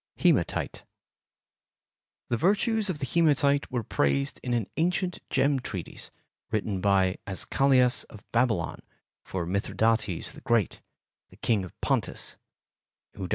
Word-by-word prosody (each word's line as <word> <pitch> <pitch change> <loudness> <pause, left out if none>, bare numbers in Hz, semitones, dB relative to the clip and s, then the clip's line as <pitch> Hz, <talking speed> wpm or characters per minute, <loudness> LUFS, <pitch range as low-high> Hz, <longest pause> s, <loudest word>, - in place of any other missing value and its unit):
Hematite - - +1 1.5
The 120 - +2
virtues 210 - +2
of 180 - -1
the 140 - -3
hematite 145 -2 +2
were 120 -2 -1
praised 70 -7 0
in 125 - -4
an 115 -4 0
ancient 180 +2 0
gem 135 +1 +2
treatise 95 -8 -6 0.4
written 105 -3 -1
by 95 -2 +2
Azchalias 125 +6 +3
of 105 - -14
Babylon 115 -7 +1 0.4
for 90 -3 -4
Mithridates 100 +1 0
the - - -12
Great, 115 -5 +1 0.6
King 110 -5 +2
of 95 - -11
Pontus - - -1 0.8
(d. 95 -3 -5
115 Hz, 115 wpm, -27 LUFS, 95-140 Hz, 1.5 s, Azchalias